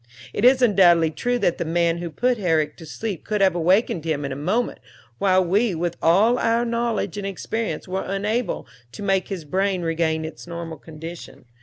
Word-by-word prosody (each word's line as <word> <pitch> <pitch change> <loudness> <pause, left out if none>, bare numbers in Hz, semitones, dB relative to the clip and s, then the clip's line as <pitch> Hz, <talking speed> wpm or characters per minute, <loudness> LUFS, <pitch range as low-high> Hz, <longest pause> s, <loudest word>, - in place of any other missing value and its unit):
It 205 - -2
is 255 +1 +6
undoubtedly 175 -7 +5
true 245 +11 -1
that 175 -7 0
the - - 0
man 170 +1 +1
who 175 0 -4
put 245 +9 0
Herrick 160 -5 +1
to 160 - -11
sleep 200 +1 -5
could 210 -1 -2
have 190 -2 +4
wakened 175 0 +2
him 155 -3 -2
in 140 - -4
a - - -3
moment, 190 - -1 0.4
while 185 -2 +3
we, 200 +3 +2
with 170 +1 -2
all 210 +9 +4
our 230 +1 +2
knowledge 235 -2 -1
and 195 - -4
experience, 220 +4 -4
were 190 +1 -2
unable 210 +5 -2 0.3
to - - -7
make 195 -1 +1
his 185 -6 -5
brain 190 +3 0
regain 160 -1 0
its 160 - -9
normal 170 -2 -6
condition. 160 -2 -10
185 Hz, 190 wpm, -23 LUFS, 165-215 Hz, 0.4 s, is